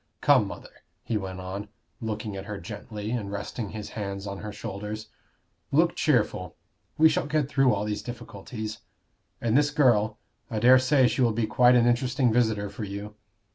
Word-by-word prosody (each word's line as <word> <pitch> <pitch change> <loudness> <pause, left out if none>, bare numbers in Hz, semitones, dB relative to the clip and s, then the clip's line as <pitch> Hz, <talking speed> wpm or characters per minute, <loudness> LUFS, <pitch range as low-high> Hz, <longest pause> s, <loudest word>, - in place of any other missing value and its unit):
Come, - - +5
mother," - - -11 0.2
he 115 - -2
went 95 -3 -3
on, 95 +3 -5 0.3
looking 110 -2 -4
at 95 0 -6
her 105 -1 -5
gently, 105 +5 -6
and 110 -5 -3
resting 100 +2 -4
his 105 0 -6
hands 100 -2 -5
on 100 -1 -5
her 105 - -6
shoulders, 105 0 -6 0.6
"look 165 +4 +3
cheerful. 105 - +1 0.4
We 160 - +7
shall 160 0 0
get 150 -2 +1
through 135 -2 +3
all 105 0 0
these 105 0 -2
difficulties. 110 -2 -7 0.6
And 115 0 +1
this 145 +1 +4
girl 115 -8 +3 0.3
I 110 - -3
dare 125 +4 +7
say 130 0 +4
she 120 +3 0
will 120 -3 +3
be 115 +1 0
quite 125 +3 +5
an 120 -1 +5
interesting 125 0 +2
visitor 110 -4 +2
for 100 +2 -7
you. 100 +1 -6
110 Hz, 175 wpm, -27 LUFS, 105-125 Hz, 0.6 s, We